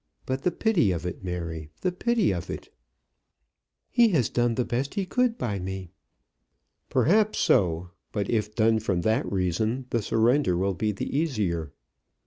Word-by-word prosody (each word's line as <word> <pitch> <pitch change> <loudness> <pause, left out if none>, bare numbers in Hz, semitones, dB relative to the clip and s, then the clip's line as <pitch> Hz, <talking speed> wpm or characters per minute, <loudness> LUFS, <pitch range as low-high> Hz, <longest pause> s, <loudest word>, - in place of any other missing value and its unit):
But 130 +1 -2
the 180 - +2
pity 180 - +2
of 85 -1 -3
it, 90 +1 -5
Mary; 85 -4 -4
the 185 - +1
pity 225 +2 +1
of 85 - -5
it!" - - -7 1.2
"He 240 -1 +5
has 155 - +2
done 120 -1 +1
the 125 - 0
best 130 +7 -2
he 200 -2 0
could 245 +3 +1
by 105 - -2
me." 95 -1 -5 1.0
"Perhaps 215 +5 +3
so; 85 -1 +2 0.2
but 100 -3 -2
if 105 -2 -1
done 110 0 +3
from 95 -5 -1
that 110 +4 0
reason, 105 +7 0
the 115 - +1
surrender 115 -2 +2
will 95 +2 +1
be 105 +5 -1
the 100 - -4
easier." 100 - -1
110 Hz, 160 wpm, -26 LUFS, 90-145 Hz, 1.2 s, He